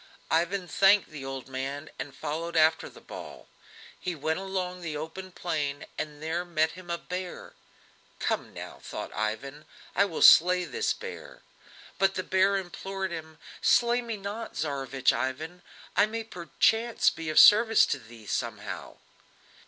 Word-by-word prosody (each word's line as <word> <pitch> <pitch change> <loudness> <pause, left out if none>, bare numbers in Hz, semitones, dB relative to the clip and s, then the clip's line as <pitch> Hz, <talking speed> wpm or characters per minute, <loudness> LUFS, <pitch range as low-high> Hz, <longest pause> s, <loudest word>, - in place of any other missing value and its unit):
Ivan 175 +3 +1
thanked 195 +1 +4
the 150 -3 -7
old 135 -1 -6
man, 135 +3 -5
and 140 -1 -6
followed 165 +4 -3
after 160 0 +4
the - - -15
ball. - - -10 0.5
He 180 -1 -3
went 160 +3 -1
along 185 -2 -3
the 155 -3 -4
open 165 +5 -7
plain, 150 -5 -3
and 150 -1 -5
there 165 +2 -1
met 160 -2 +1
him 180 -1 -12
a 170 - -1
bear. 180 +1 -6 0.6
"Come - - -1
now!" - - -9
thought - - -6
Ivan, 135 +8 -3 0.3
"I 200 - +5
will 170 -6 -1
slay 180 +2 +8
this 445 -1 -1
beast." 475 +2 -7 0.6
But 195 0 +3
the 185 - -1
bear 190 +2 +3
implored 190 +1 -4
him: 160 -2 -7 0.2
"Slay 240 0 +4
me 230 -2 -4
not, 205 +3 -6
Tsarevich 135 -3 0
Ivan, 160 +7 -3 0.3
I 210 - +5
may 225 +1 -4
perchance 225 +4 +1
be 165 -1 -6
of 155 - -2
service 225 +2 +8
to 145 - -2
thee 115 -2 -14
somehow." - - -4
170 Hz, 155 wpm, -28 LUFS, 150-195 Hz, 0.6 s, slay